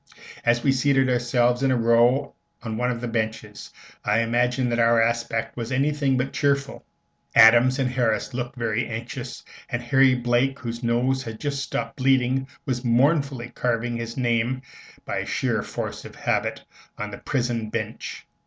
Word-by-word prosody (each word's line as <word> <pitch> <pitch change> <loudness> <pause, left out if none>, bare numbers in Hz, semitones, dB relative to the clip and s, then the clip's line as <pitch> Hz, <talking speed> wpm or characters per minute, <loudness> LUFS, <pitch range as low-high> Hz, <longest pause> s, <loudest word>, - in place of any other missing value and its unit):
As 120 0 +2
we 135 - +4
seated 135 -1 +2
ourselves 120 0 +2
in 135 - +2
a 130 - +2
row 120 +4 +3 0.3
on 110 -2 -4
one 125 +2 0
of 120 -1 -3
the 125 - -3
benches, 110 -2 -4 0.3
I 105 +2 +2
imagine 125 +2 +1
that 120 0 0
our 115 0 +4
aspect 115 0 0
was 120 0 -5
anything 140 0 +1
but 130 +2 -2
cheerful. 140 -1 0 0.5
Adams 120 +3 +7
and 135 -2 +1
Harris 125 -1 0
looked 125 +1 -4
very 115 -1 -1
anxious, 120 +2 -6 0.3
and 120 - -2
Harry 130 +1 +4
Blake, 125 +2 +1
whose 115 0 -6
nose 125 +2 +1
had 115 -3 -7
just 140 -2 -2
stopped 135 - -4
bleeding, 130 0 +2 0.2
was 125 -1 -2
mournfully 130 0 +2
carving 120 -1 -1
his 115 +1 -5
name, 120 +1 0 0.4
by - - -2
sheer - - -1
force - - -5
of - - -11
habit, - - -1 0.3
on 105 0 -5
the 100 - -8
prison 120 -4 -2
bench. 110 0 -5
120 Hz, 165 wpm, -24 LUFS, 115-130 Hz, 0.5 s, Adams